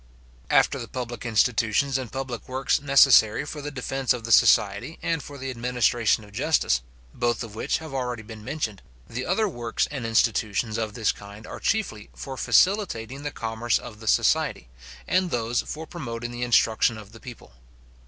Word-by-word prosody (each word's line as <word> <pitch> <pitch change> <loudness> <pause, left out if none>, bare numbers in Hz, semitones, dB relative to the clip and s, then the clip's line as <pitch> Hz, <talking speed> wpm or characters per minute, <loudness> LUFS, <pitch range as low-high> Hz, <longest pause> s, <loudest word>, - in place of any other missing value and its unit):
After - - +3
the - - -6
public 125 -1 -5
institutions 115 +4 +2
and 130 -3 -6
public 130 -3 -5
works 130 +2 0
necessary 135 -5 +5
for 150 0 -6
the 145 - -4
defence 135 -1 -1
of 120 -2 -6
the 115 - -4
society, 105 +8 +4
and 165 -2 0
for 145 0 -10
the 135 -1 -4
administration 120 -2 +1
of 105 - -15
justice, 120 - +1 0.3
both 120 -1 0
of 110 -2 -9
which 110 - -1
have 160 -3 -9
already 125 -4 -3
been 110 -1 -10
mentioned, 115 -6 -4 0.3
the 120 +2 -5
other 210 +5 +2
works 120 - -2
and 140 -5 -4
institutions 110 -1 +1
of 110 -2 -3
this 110 -3 +2
kind 105 +1 -12
are - - -8
chiefly 195 - -1
for 135 - -7
facilitating 140 - +2
the 145 - -3
commerce 115 -2 -1
of 105 -3 -10
the 110 - -10
society, - - +2 0.4
and 185 0 +2
those 120 -3 0
for 160 +1 -7
promoting 120 -8 -6
the 120 0 -7
instruction 115 -1 +3
of 105 -1 -12
the 115 - -13
people. 120 - -12
120 Hz, 175 wpm, -25 LUFS, 110-135 Hz, 0.4 s, necessary